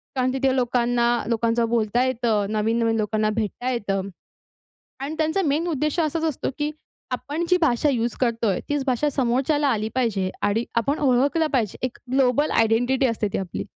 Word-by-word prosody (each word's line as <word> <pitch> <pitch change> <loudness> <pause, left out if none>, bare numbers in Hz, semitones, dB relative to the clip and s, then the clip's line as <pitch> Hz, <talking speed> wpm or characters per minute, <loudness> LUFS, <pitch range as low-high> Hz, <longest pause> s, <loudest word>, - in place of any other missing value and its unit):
कारण 255 0 +1
तिथे 265 0 +1
लोकांना 245 -1 +1 0.2
लोकांचं 230 0 +1
बोलता 235 +1 +1
येतं, 230 -5 0
नवीन-नवीन 225 +1 +1
लोकांना 215 0 0
भेटता 225 +4 -3
येतं 200 -5 -2 0.9
आणि 280 +3 -4
त्यांचा 315 +5 +1
मेन 310 +1 0
उद्देश 305 +1 -1
असाच 325 +1 0
असतो 310 -5 -1
की 295 0 0 0.4
आपण 285 +7 -3
जी 360 - +5
भाषा 295 -3 +2
यूज 235 -3 0
करतोय, 230 -6 +1
तीच 290 -2 -1
भाषा 260 +3 +1
समोरच्याला 275 +3 +1
आली 220 -3 0
पाहिजे, 215 -7 0
आणि 220 +3 +1
आपण 255 +6 +1
ओळखलं 280 +4 +2
पाहिजे. 230 -7 0
एक 250 - -9
ग्लोबल 270 +2 +2
आयडेंटिटी 245 +4 +2
असते 225 -3 -1
ती - - 0
आपली. 185 -3 -4
245 Hz, 160 wpm, -23 LUFS, 225-280 Hz, 0.9 s, जी